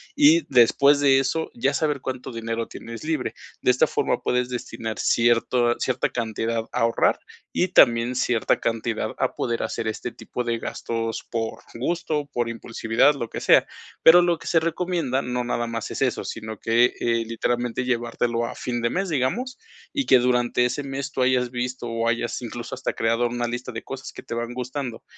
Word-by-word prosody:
y 305 +3 +6
después 140 +4 +5
de 135 -2 +5
eso, 150 +4 -1
ya 135 +4 0
saber 150 -3 0
cuánto 130 0 -5
dinero 115 0 -3
tienes 115 +2 -9
libre. 155 -4 -2 0.3
De - - +4
esta 125 - +3
forma - - 0
puedes 125 0 0
destinar 115 -2 -5
cierto 120 +1 +3
cierta 130 -1 0
cantidad 115 -1 -2
a - - -2
ahorrar 115 0 +2 0.3
y 185 - +1
también 120 -6 +5
cierta 120 -2 +1
cantidad 115 -1 -1
a - - -1
poder 115 -1 -1
hacer 110 0 -3
este 110 - -3
tipo 125 - -5
de 115 -1 -1
gastos 115 0 -3
por 115 -1 -3
gusto, 155 +3 -1
por 120 -1 0
impulsividad, 115 +4 +1
lo 120 -5 -4
que - - -5
sea, - - +5 0.4
pero, 175 +2 +8
lo 175 -1 +2
que - - -10
se 165 - +4
recomienda 165 -5 -1
no 125 -1 -2
nada 120 -1 -1
más 115 -1 -4
es - - -5
eso, 130 -2 +1
sino 110 -1 -6
que, 120 +2 +3
eh, 115 -1 +1
literalmente 120 +2 -1
llevártelo 120 -1 0
a - - -6
fin 120 -1 -3
de 120 - +1
mes, 195 +6 -1
digamos, 195 - -1 0.4
y 280 -2 0
que 130 - +7
durante 125 0 +2
ese 145 +4 -2
mes, 135 0 -4
tú 130 - -1
hayas 125 -1 +2
visto 125 0 -3
o 115 0 -1
hayas 120 +1 -1
incluso 120 0 -6
hasta - - -2
creado 115 +2 +1
una 120 0 -2
lista 125 +1 -4
de 115 -1 -6
cosas 135 0 -7
que - - -10
te - - -6
van 120 +1 -3
gustando 125 -1 -5
120 Hz, 190 wpm, -24 LUFS, 115-135 Hz, 0.4 s, pero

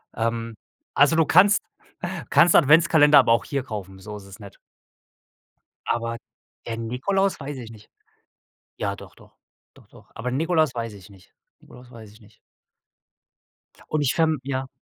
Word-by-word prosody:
Ähm, 115 0 -3 0.4
also 145 +3 +4
du 165 -1 +3
kannst 200 +7 +5 0.7
kannst 170 0 +5
Adventskalender 150 -1 +6
aber 120 -4 +3
auch 115 - +2
hier 140 -3 -3
kaufen, 100 -6 -8
so 105 +2 -9
ist 100 - -13
es 100 +1 -14
nicht. 100 -2 -13 1.3
Aber 115 0 -2 0.5
der 115 - -4
Nikolaus 130 - -1
weiß 140 -1 -7
ich 115 -3 -9
nicht. 105 -2 -16 0.9
Ja, - - -3
doch, - - -14
doch, - - -21 0.4
doch, - - -20
doch. - - -19
Aber 120 +2 -4
Nikolaus 155 0 +1
weiß 115 -2 -4
ich 100 +1 -15
nicht, 95 -2 -20 0.3
Nikolaus 125 0 -16
weiß 110 -4 -13
ich 110 - -20
nicht. 105 0 -22 1.5
Und 155 - 0
ich 135 -3 +1
verm 160 -3 +1
ja? 130 -1 -4
125 Hz, 155 wpm, -23 LUFS, 110-150 Hz, 1.5 s, Adventskalender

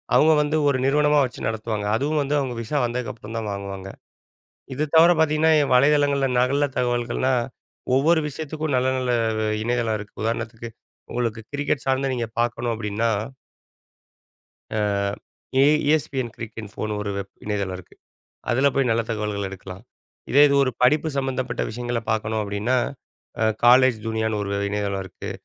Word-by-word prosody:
அவங்க 160 +1 +6
வந்து 150 +1 0
ஒரு 135 - +1
நிறுவனமா 150 +1 +3
வச்சு 125 - -6
நடத்துவாங்க. 110 -1 -3
அதுவும் 145 +5 0
வந்து 145 +1 0
அவங்க 130 -3 -3
விசா 115 +6 -2
வந்ததுக்கப்புறம் 115 -2 -5
தான் 110 -2 -3
வாங்குவாங்க. 100 -1 -6 0.8
இது 145 +4 -1
தவர 165 +2 +8
பாத்தீங்கன்னா 160 0 +3 0.2
வலைதளங்கள்ல 140 0 +3
நகல 140 +3 +2
தகவல்கள்லாம் 120 +1 +1 0.5
ஒவ்வொரு 160 +5 +4
விஷயத்துக்கும் 155 0 -3
நல்ல 125 +1 +2
நல்ல 125 -1 -1 0.5
இணையதளம் 115 -2 0
இருக்கு. 105 0 -11
உதாரணத்துக்கு 115 +1 -3 0.4
உங்களுக்கு 115 -2 -2
கிரிக்கெட் 145 -1 -1
சார்ந்த 135 +1 +1
நீங்க 120 -2 -2
பார்க்கணும் 120 0 -1
அப்படின்னா 110 +1 -1 1.7
அ - - 0 0.8
ESPNcricinfoனு 125 -8 0
ஒரு 100 - -3
வெப் 100 0 -7
இணையதளம் 100 -3 -2
இருக்கு. 90 - -15 0.6
அதுல 130 +4 +3
போய் 135 -2 +2
நல்ல 115 +1 +2
தகவல்கள் 105 -2 -2
எடுக்கலாம். 95 0 -9 0.5
இதே 145 - +6
இது 140 - +1
ஒரு 130 - 0
படிப்பு 150 +5 +4
சம்மந்தப்பட்ட 130 -2 -2
விஷயங்களை 120 +1 -3
பார்க்கணும் 110 0 -1
அப்படீன்னா, 105 +5 -1 0.7
அ - - +4 0.2
college 125 0 +6
Juniorன்னு 110 -1 -1
ஒரு 100 0 -2
இணையதளம் 100 -1 -2
இருக்கு. 95 - -8
120 Hz, 135 wpm, -23 LUFS, 110-140 Hz, 1.7 s, தவர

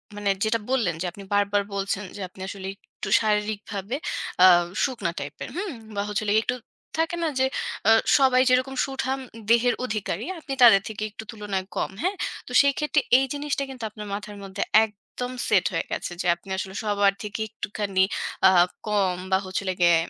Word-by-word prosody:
মানে 205 -1 -1
যেটা 220 +1 +1
বললেন 235 -10 +1
যে - - -1
আপনি 200 +3 -11
বারবার 205 0 +3
বলছেন 195 0 -2
যে 205 - -7
আপনি 185 - -14
আসলে 195 -1 -6
একটু 195 - -9
শারীরিকভাবে 210 0 -1 0.5
আ - - +11 0.4
শুকনা 250 -11 -1
টাইপের, - - -6
হুম? 380 +1 -3 0.2
বা 200 - 0
হচ্ছে 210 +1 -1
হলো 205 - 0
গিয়ে 220 - +5
একটু 250 - 0 0.4
থাকে 325 +1 +1
না - - +2
যে 260 - +4 0.4
অ - - +8 0.3
সবাই 260 -2 +5
যেরকম 255 +1 +2
সুঠাম 270 0 -2 0.3
দেহের 235 +1 +4
অধিকারী 215 -3 -3
আপনি 285 -3 -5
তাদের 210 -5 +8
থেকে 215 -1 -5
একটু 215 - -8
তুলনায় 205 -4 -3
কম, - - -1
হ্যাঁ? 375 +3 0 0.3
তো - - -9
সেইক্ষেত্রে 295 +1 +2 0.2
এই 270 - +2
জিনিসটা 285 -1 -2
কিন্তু 255 -3 -8
আপনার 210 0 -9
মাথার 205 0 -6
মধ্যে 195 +1 -3 0.2
একদম 220 +4 -8 0.2
সেট - - +4
হয়ে - - -1
গেছে - - -3
যে - - -5
আপনি 175 +3 -17
আসলে 190 0 -4
সবার 205 -2 +3
থেকে 210 +1 -5
একটুখানি 205 -3 -2 0.5
আ - - +8 0.4
কম 200 -3 +2 0.2
বা 190 - +5
হচ্ছে 185 +1 -2
হলো 185 - 0
গিয়ে 175 -1 +6
210 Hz, 180 wpm, -25 LUFS, 200-255 Hz, 0.5 s, আ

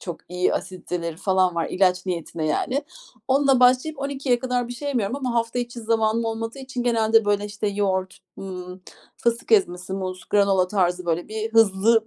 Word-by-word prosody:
çok 175 -3 -6
iyi 180 0 0
asiditeleri 175 -3 -4
falan 185 -1 +2
var. 165 -1 0
İlaç 185 0 +2
niyetine, 165 -2 -3
yani. 260 - 0 0.5
Onunla 270 -1 +4
başlayıp 255 +4 +4
12.00'ye 275 -3 0
kadar 250 -1 -1
bir - - -5
şey 285 +4 -5
yemiyorum 240 -2 -1
ama 255 -4 -3
hafta 230 +1 0
içi 240 -1 -4
zamanım 225 0 +1
olmadığı 225 +2 -4
için 260 -2 -5
genelde, 225 -2 +3
böyle, 205 0 +1
işte, 210 0 -4
yoğurt, 190 -2 -1 0.2
hımm, 180 -1 -8 0.3
fıstık 235 0 -1
ezmesi, 185 -3 +2
muz, 185 -1 -4
granola 195 -3 +3
tarzı, 180 -3 0
böyle, 215 +7 -2
hızlı 225 +1 +4
215 Hz, 165 wpm, -23 LUFS, 185-240 Hz, 0.5 s, Onunla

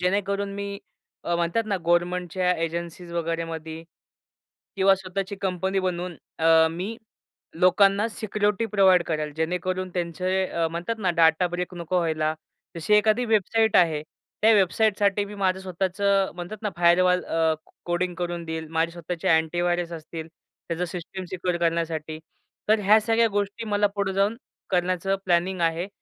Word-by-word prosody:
जेणेकरून 200 +2 0
मी 200 0 -5 0.5
अ, 170 - 0
म्हणतात 175 +7 0
ना 200 - +1
गव्हर्नमेंटच्या 180 +1 +1
एजन्सीज 170 +1 -5
वगैरेमध्ये 165 -1 -4 0.9
किंवा 195 0 +5
स्वतःची 190 +1 -4
कंपनी 190 0 -1
बनवून 180 -1 -3 0.2
अ, 160 0 +5
मी 190 +7 -5 0.6
लोकांना 195 +3 +4
सिक्युरिटी 210 0 -1
प्रोव्हाईड 190 -5 +4
करेल 155 -2 -3
जेणेकरून 180 +3 -2
त्यांचे 185 +2 -1
अ, 165 -2 -1
म्हणतात 175 +7 -3
ना 185 -3 +1
डाटा 160 +2 +5
ब्रेक 180 +1 -4
नको 175 +1 -2
व्हायला. 155 -2 0 0.4
जशी 170 +5 0
एखादी 215 +3 +4
वेबसाईट 220 0 +2
आहे, 160 -4 +4 0.4
त्या 220 - +6
वेबसाईटसाठी 205 0 +2
मी 205 +1 -9
माझं 190 -1 0
स्वतःचं 190 +1 0
म्हणतात 175 +4 -6
ना 210 - 0
फायरवॉल 180 +1 +4
अ, 165 -1 +1 0.3
कोडिंग 175 +1 -1
करून 175 0 -3
देईल. 160 0 -5
माझे 165 +1 +1
स्वतःचे 170 0 -5
अँटीव्हायरस 175 +2 +1
असतील 160 0 -7
त्याचं 170 +1 -7
सिस्टम 180 +2 -7
सिक्युअर 180 -1 -2
करण्यासाठी. 165 -2 -1 0.5
तर 215 0 +5
ह्या 210 +2 +5
सगळ्या 230 +1 +3
गोष्टी 205 +3 -2
मला 205 -1 +2
पुढे 200 -1 -1
जाऊन 200 +3 +1 0.3
करण्याचं 185 +1 +1
प्लॅनिंग 180 +1 +1
आहे. 165 +2 0
180 Hz, 140 wpm, -25 LUFS, 170-200 Hz, 0.9 s, त्या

